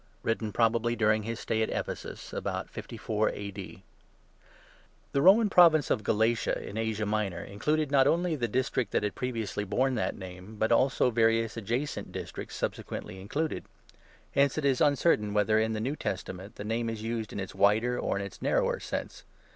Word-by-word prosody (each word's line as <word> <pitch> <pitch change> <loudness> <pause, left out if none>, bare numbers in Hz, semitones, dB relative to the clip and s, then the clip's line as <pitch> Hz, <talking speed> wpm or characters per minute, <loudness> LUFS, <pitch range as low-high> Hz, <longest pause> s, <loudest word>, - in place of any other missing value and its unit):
WRITTEN 115 -1 -1
PROBABLY 115 +1 +2
DURING 110 -2 +3
HIS 115 +2 -5
STAY 110 - 0
AT 110 - +1
EPHESUS, - - -5
ABOUT - - -3
54 110 0 -2
A.D. 100 -1 -7 1.3
THE 140 - +1
Roman 205 +6 +7
province 165 -7 +6
of 105 - +1
'Galatia,' 115 +2 +1
in 100 - -7
Asia 110 -1 -1
Minor, 105 -3 -1
included, 150 +8 -1
not 135 -2 +5
only 170 0 +2
the 120 -5 -1
district 125 -1 -1
which - - +2
had 105 - -1
previously 115 -5 -3
borne 125 +7 +1
that 115 - -1
name, 95 +2 -9
but 110 +2 0
also 125 +1 +3
various 115 -1 +2
adjacent 120 +6 -3
districts - - -6
subsequently 95 - -4
included. 150 +11 -2 0.7
Hence 140 +1 +2
it 155 - -1
is 135 -2 +2
uncertain 140 -8 +3
whether, 110 +1 +3
in 110 0 +1
the 110 - -2
New 130 +7 -1
Testament, 95 -4 -5
the - - -6
name 115 +2 -1
is 110 -1 -5
used 115 -1 -3
in - - -5
its 95 -1 -5
wider 110 +5 +3
or - - -1
in 100 - -2
its 100 - -10
narrower - - +1
sense. - - -5
115 Hz, 175 wpm, -29 LUFS, 105-130 Hz, 1.3 s, Roman